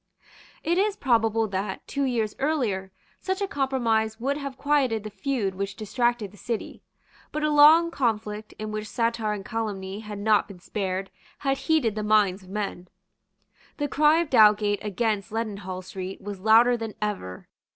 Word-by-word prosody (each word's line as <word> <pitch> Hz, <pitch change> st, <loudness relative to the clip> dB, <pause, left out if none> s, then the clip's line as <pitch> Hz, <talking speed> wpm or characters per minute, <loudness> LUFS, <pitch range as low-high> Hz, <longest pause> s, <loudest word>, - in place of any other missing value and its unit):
It 345 Hz, +3 st, +1 dB
is 410 Hz, 0 st, +2 dB
probable 225 Hz, -3 st, +2 dB
that, 190 Hz, 0 st, -3 dB
two 280 Hz, -1 st, -1 dB
years 230 Hz, -5 st, -1 dB
earlier, 235 Hz, -11 st, -1 dB, 0.3 s
such 380 Hz, 0 st, -2 dB
a 400 Hz, -, -1 dB
compromise 235 Hz, -, 0 dB
would 275 Hz, +4 st, 0 dB
have 275 Hz, -2 st, -6 dB
quieted 265 Hz, -7 st, +1 dB
the 215 Hz, -, -7 dB
feud 205 Hz, -1 st, -2 dB
which 195 Hz, +1 st, -4 dB
distracted 230 Hz, -1 st, -1 dB
the 205 Hz, -, -17 dB
City. 230 Hz, +1 st, -5 dB, 0.5 s
But 305 Hz, -, -3 dB
a 305 Hz, -, +2 dB
long 310 Hz, +3 st, +7 dB
conflict, 215 Hz, -5 st, -2 dB
in 215 Hz, 0 st, -5 dB
which 215 Hz, 0 st, -4 dB
satire 230 Hz, -3 st, 0 dB
and 200 Hz, -2 st, -6 dB
calumny 205 Hz, -4 st, -4 dB
had 210 Hz, -1 st, -7 dB
not 210 Hz, +1 st, +2 dB
been 200 Hz, -, -11 dB
spared, 190 Hz, +1 st, -3 dB, 0.3 s
had 270 Hz, -1 st, -1 dB
heated 310 Hz, -9 st, +1 dB
the 215 Hz, -, -3 dB
minds 210 Hz, -2 st, +3 dB
of 185 Hz, -, -16 dB
men. 195 Hz, -3 st, -4 dB, 0.9 s
The 290 Hz, -, -1 dB
cry 300 Hz, +2 st, +4 dB
of 335 Hz, -, -5 dB
Dowgate 210 Hz, -3 st, +5 dB
against 210 Hz, 0 st, -1 dB
Leadenhall 200 Hz, -5 st, -4 dB
Street 185 Hz, +1 st, -6 dB
was 200 Hz, -1 st, -7 dB
louder 225 Hz, +4 st, +5 dB
than 225 Hz, -2 st, -5 dB
ever. 195 Hz, -, -4 dB
220 Hz, 165 wpm, -26 LUFS, 205-265 Hz, 0.9 s, long